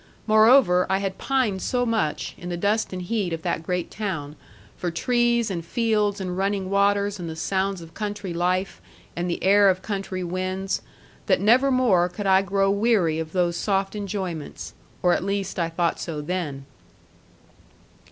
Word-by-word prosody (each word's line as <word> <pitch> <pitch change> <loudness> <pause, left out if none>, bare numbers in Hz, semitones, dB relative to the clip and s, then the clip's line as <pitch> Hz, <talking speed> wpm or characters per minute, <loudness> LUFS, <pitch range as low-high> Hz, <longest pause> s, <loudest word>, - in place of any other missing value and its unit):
Moreover, 215 -4 +5
I 190 - +2
had 195 -1 -3
pined 250 -8 0
so 245 +4 0
much, 220 -10 -1
in 175 - -7
the 175 - -3
dust 205 +5 0
and 185 -1 -5
heat 190 -2 -1
of 165 - -5
that - - -1
great 180 +1 -3
town, 170 -9 -4 0.4
for 180 - -3
trees, 235 +4 +1
and 170 -3 -3
fields, 210 +1 0
and 180 -2 -3
running 195 0 -1
waters, 200 0 +2
and 170 -2 -5
the 160 - -6
sounds 190 +2 -1
of 165 0 -12
country 205 -3 -4
life, 180 +3 -1 0.3
and 175 +1 -2
the 170 - -3
air 200 +1 +6
of 185 0 0
country 195 -3 -3
winds, 185 +2 -2 0.5
that - - +3
never 245 +7 +4
more 220 -10 +3
could 200 +3 -6
I 190 0 +5
grow 195 0 +1
weary 200 -7 +2
of 160 -1 -5
those 175 -2 0
soft 195 0 0
enjoyments; 190 -6 -5 0.3
or 180 -1 +4
at - - 0
least 195 -1 -2
I 165 -1 0
thought 170 0 -1
so 160 -3 -4
then. 150 -4 -4
190 Hz, 170 wpm, -24 LUFS, 175-205 Hz, 0.5 s, air